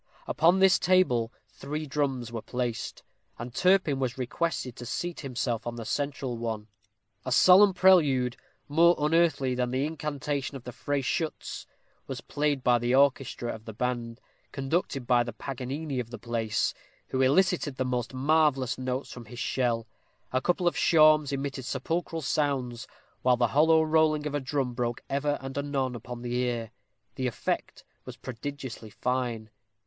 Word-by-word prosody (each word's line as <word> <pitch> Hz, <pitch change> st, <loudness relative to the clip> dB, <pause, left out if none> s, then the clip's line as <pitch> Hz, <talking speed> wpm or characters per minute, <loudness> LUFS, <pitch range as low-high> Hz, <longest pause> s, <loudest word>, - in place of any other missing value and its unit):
Upon 170 Hz, +4 st, +3 dB
this 190 Hz, -1 st, +5 dB
table 125 Hz, -11 st, +3 dB, 0.2 s
three 150 Hz, +3 st, -5 dB
drums 135 Hz, -5 st, -2 dB
were 115 Hz, -2 st, -4 dB
placed; 120 Hz, -1 st, -4 dB, 0.3 s
and 120 Hz, +1 st, -7 dB
Turpin 180 Hz, -5 st, +3 dB
was 130 Hz, -1 st, -2 dB
requested 130 Hz, -1 st, -2 dB
to 120 Hz, -, -7 dB
seat 175 Hz, +7 st, -3 dB
himself 120 Hz, -4 st, -3 dB
on 120 Hz, -, -3 dB
the 115 Hz, -1 st, -6 dB
central 135 Hz, -1 st, -2 dB
one. 110 Hz, -2 st, -4 dB, 0.5 s
A -, -, -4 dB
solemn 195 Hz, +2 st, +7 dB
prelude, 150 Hz, -10 st, +4 dB, 0.3 s
more 170 Hz, +4 st, +5 dB
unearthly 150 Hz, -4 st, +2 dB
than 125 Hz, 0 st, -1 dB
the 130 Hz, +3 st, 0 dB
incantation 145 Hz, -2 st, -3 dB
in 130 Hz, -, -8 dB
the 125 Hz, -, -5 dB
Freyschütz, 145 Hz, +5 st, -3 dB, 0.4 s
was -, -, -5 dB
played 145 Hz, -2 st, -1 dB
by 120 Hz, -1 st, +4 dB
the 120 Hz, +2 st, +1 dB
orchestra 135 Hz, -3 st, +2 dB
of 110 Hz, 0 st, -11 dB
the 110 Hz, -, -7 dB
band, 120 Hz, 0 st, -3 dB, 0.3 s
conducted 135 Hz, -1 st, -2 dB
by 120 Hz, 0 st, +4 dB
the 120 Hz, -1 st, -3 dB
Paganini 135 Hz, +3 st, -4 dB
of 120 Hz, -2 st, -4 dB
the 120 Hz, -, -7 dB
place, 115 Hz, -2 st, -1 dB, 0.4 s
who 130 Hz, -, 0 dB
elicited 150 Hz, +1 st, +2 dB
the 130 Hz, -, -1 dB
most 125 Hz, -2 st, -2 dB
marvellous 135 Hz, -2 st, +2 dB
notes 130 Hz, +1 st, -3 dB
from 120 Hz, -2 st, -9 dB
his 120 Hz, +3 st, -11 dB
shell. 120 Hz, -3 st, 0 dB, 0.5 s
A 130 Hz, -, +2 dB
couple 175 Hz, +3 st, +1 dB
of 175 Hz, -, +2 dB
shawms 155 Hz, -3 st, +5 dB
emitted 140 Hz, -1 st, -3 dB
sepulchral 165 Hz, +5 st, -3 dB
sounds, 130 Hz, -5 st, -1 dB, 0.3 s
while 125 Hz, -1 st, +3 dB
the 120 Hz, -1 st, +2 dB
hollow 160 Hz, +2 st, +5 dB
rolling 155 Hz, -1 st, +2 dB
of 150 Hz, -, -3 dB
a 145 Hz, -, +1 dB
drum 130 Hz, -2 st, -2 dB
broke 120 Hz, -1 st, -2 dB
ever 145 Hz, +1 st, 0 dB
and 135 Hz, 0 st, -7 dB
anon 140 Hz, -3 st, -1 dB
upon 120 Hz, +1 st, -7 dB
the 120 Hz, 0 st, -3 dB
ear. 120 Hz, -3 st, -2 dB, 0.4 s
The 130 Hz, -2 st, -2 dB
effect 120 Hz, -, -3 dB, 0.2 s
was -, -, -9 dB
prodigiously 130 Hz, -2 st, -7 dB
fine. 120 Hz, -2 st, -2 dB
130 Hz, 160 wpm, -28 LUFS, 120-150 Hz, 0.5 s, solemn